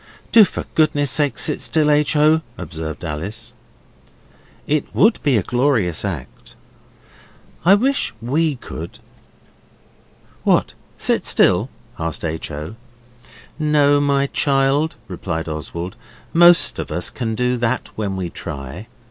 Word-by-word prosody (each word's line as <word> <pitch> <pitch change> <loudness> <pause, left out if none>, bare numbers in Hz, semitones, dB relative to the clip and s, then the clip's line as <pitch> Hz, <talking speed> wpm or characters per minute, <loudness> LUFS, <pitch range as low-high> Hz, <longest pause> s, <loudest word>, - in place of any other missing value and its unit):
'Do 225 - +8
for - - -3
goodness 145 -3 +2
sake 145 -4 +1
sit - - +1
still, 150 -2 +2
H. 150 0 +2
O.,' 155 +2 +4 0.2
observed 80 -1 -6
Alice. 85 +9 -5 1.1
'It 150 -1 0
would 220 +4 +4
be 140 -5 +2
a 100 - 0
glorious 120 - +1
act! 85 -10 -7 1.1
I 190 +3 +7
wish 270 +6 0
WE 145 +6 0
could.' 85 -8 -8 1.5
'What, - - +2 0.2
sit - - 0
still?' - - +3 0.3
asked 80 0 -3
H. 80 0 -4
O. 75 +8 -7 0.8
'No, 145 -2 +3
my 140 -1 +2
child,' 140 +2 +1
replied 85 -3 -4
Oswald, 85 +3 -5 0.4
'most 175 +1 +5
of - - -5
us - - -2
can 115 -2 -3
do 125 +2 0
that 120 +1 -1
when 100 -3 -3
we 90 -3 -4
try. 75 +9 -7
125 Hz, 125 wpm, -20 LUFS, -, 1.5 s, Do